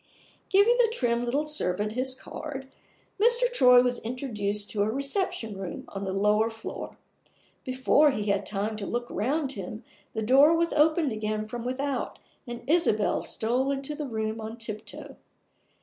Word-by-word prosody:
Giving 405 +5 +5
the 460 -2 +4
trim 240 - 0
little 275 +5 0
servant 210 -9 +1
his 255 +3 0
card, 270 +1 -7 0.6
Mr. 475 +2 +4
Troy 250 - +7
was 250 -1 0
introduced 210 -4 -2
to 210 - -1
a 205 - +2
reception 275 - -1
room 190 -2 -6
on 195 0 -5
the 190 - -2
lower 210 +3 +2
floor. 225 0 -8 0.7
Before 260 +4 +3
he 215 -6 -2
had 200 - 0
time 210 +1 -3
to 200 -2 -5
look 240 0 -2
round 275 +5 -1
him 215 0 -7 0.3
the 220 - -1
door 275 +8 +6
was 335 0 +1
opened 310 -1 +3
again 215 0 -2
from 230 +2 -6
without, 265 +2 -3 0.3
and 240 0 -7
Isabel 295 -10 +2
stole 250 +4 -1
into 275 +1 -2
the 295 -1 -5
room 220 -1 -3
on 220 +1 -6
tiptoe. 215 -2 -7
245 Hz, 160 wpm, -27 LUFS, 215-280 Hz, 0.7 s, Troy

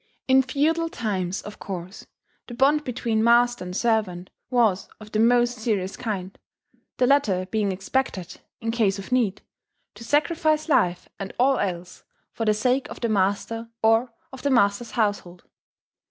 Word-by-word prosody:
In 265 0 +6
feudal 315 +5 0
times, 195 - -3
of 210 - -10
course, 185 0 -7 0.4
the 240 - -8
bond 285 +4 +3
between 230 -3 -1
master 240 -1 +4
and 180 0 -5
servant 210 -6 0 0.2
was 220 -6 +2
of 215 -1 -12
the 215 - 0
most 240 +1 +3
serious 200 -4 -1
kind; 195 -6 -4 0.6
the 250 - +3
latter 230 -9 +2
being 210 -3 0
expected, 190 -2 -3 0.2
in 225 0 -1
case 215 -4 +1
of 195 +5 -9
need, 230 -6 +1 0.5
to - - -12
sacrifice 310 +4 +1
life 180 - +1
and 195 -1 -6
all 265 +2 +3
else 180 -2 -4 0.3
for 225 - -3
the 215 - +4
sake 250 +4 0
of - - -8
the 235 - -1
master 215 +3 -1
or 225 +2 +3 0.2
of 260 - -9
the 285 - 0
master's 235 -2 +2
household. 205 -5 -2
225 Hz, 155 wpm, -24 LUFS, 195-250 Hz, 0.6 s, In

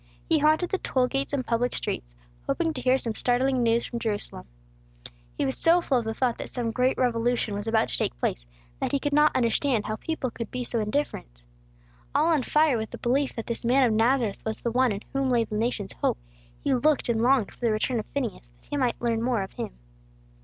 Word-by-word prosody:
He 325 -2 +3
haunted 310 +4 +3
the 385 - 0
toll 255 -1 +1
gates 270 +2 -2
and 275 -3 -1
public 240 +1 0
streets, - - -4 0.3
hoping 325 -1 0
to - - -5
hear 255 +1 +4
some 230 -4 -3
startling 250 +3 +1
news 230 0 +2
from 235 - -4
Jerusalem. 205 - -3 0.9
He - - +1
was 130 - 0
so 335 +2 +4
full 275 -7 +1
of 230 - -5
the 220 - -2
thought 250 -3 0
that - - -5
some 235 -2 -2
great 250 +3 +1
revolution 240 -2 +1
was 205 +2 -4
about 225 0 +2
to - - -1
take - - -1
place, - - -2 0.3
that - - -1
he 280 - +3
could 290 +1 -2
not 300 +1 +4
understand 240 -1 +1
how 215 - -3
people 300 -4 -3
could 230 -1 -6
be 250 0 -3
so 235 -1 -2
indifferent. 210 - -3 0.7
All 305 - +4
on 300 - +2
fire 300 -1 +3
with 220 0 -4
the - - -8
belief 265 +3 0
that 225 - -4
this 235 - -4
man 255 +3 +4
of 235 -3 +3
Nazareth 230 -1 +1
was 220 0 -3
the 235 - -1
one 255 0 +3
in 200 0 -3
whom 270 -1 +1
lay 240 -2 +3
the 215 - -8
nation's 210 -3 -1
hope, - - 0 0.5
he - - +2
looked 300 +3 +2
and 230 -2 +1
longed 250 -3 +3
for - - -22
the 235 -2 +1
return 225 +3 0
of 215 - -6
Phineas, 240 - -4
that 120 0 -29
he 290 - -1
might 250 -4 0
learn 230 -2 0
more 235 -4 +1
of 190 - -9
Him. - - -4
240 Hz, 230 wpm, -26 LUFS, 220-270 Hz, 0.9 s, hear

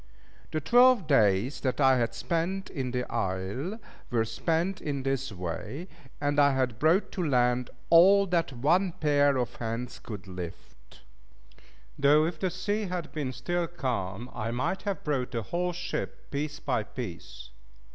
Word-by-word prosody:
The 155 - -1
twelve 245 - +5
days 115 -3 +3
that 130 0 -1
I 135 -2 +5
had 115 -1 -1
been 175 +3 0
in 130 -5 -2
the 125 0 -1
isle 100 - -2 0.3
were 115 -2 +1
spent 165 - -1
in 140 -3 -3
this 135 -2 -1
way, 95 - -5 0.3
and 145 0 +1
I 140 -1 +5
had 125 -4 0
brought 165 +7 +3
to 180 - -2
land 125 -4 +2 0.2
all 195 +4 +7
that 170 -4 0
one 165 +9 +2
pair 145 -3 +3
of 125 -2 -2
hands 115 +2 -4
could 105 -4 -8
lift; 90 -8 -10 1.0
though 145 +2 +5
if 165 -1 -3
the 185 - 0
sea 205 +4 -2
had 180 -3 -4
been 145 -4 -3
still 175 +6 -2
calm, 120 - -3
I 110 +1 -3
might 125 +11 -1
have 195 - -3
brought 135 -5 -1
the 115 -3 -3
whole 180 - -1
ship, 175 +1 -5
piece 150 +1 -3
by 125 -5 0
piece. 85 - -8
140 Hz, 155 wpm, -28 LUFS, 120-170 Hz, 1.0 s, all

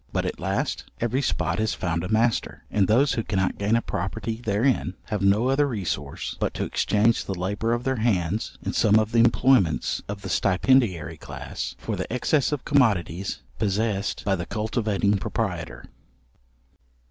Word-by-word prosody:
But - - -1
at - - -4
last, - - -2
every 120 +4 0
spot 120 - -1
has 110 -1 0
found 85 -2 -2
a 90 - -4
master, 115 +2 +1
and 100 -3 +2
those 130 +6 +4
who 115 - 0
cannot 95 -3 -1
gain 105 +3 +2
a 115 - +1
property 110 +5 -3
therein, 105 -3 +1
have 105 -3 -2
no 100 +5 +3
other 145 +2 +3
resource 85 - -3
but - - -1
to - - -1
exchange 110 +2 +1
the 95 - -3
labour 105 +5 -1
of 120 +1 -1
their 130 0 0
hands 105 -3 0
in - - -2
some 105 -1 +4
of 110 0 +1
the 115 - +3
employments 115 - +3
of 100 -1 -5
the - - -5
stipendiary 95 -5 +2
class, - - -6
for - - -4
the - - -5
excess 135 +4 +1
of 145 -3 -3
commodities 100 - +1 0.2
possessed 105 0 -1
by 100 -1 +2
the 85 -1 -5
cultivating 105 -1 0
proprietor. - - -3
105 Hz, 170 wpm, -25 LUFS, 95-115 Hz, 0.2 s, those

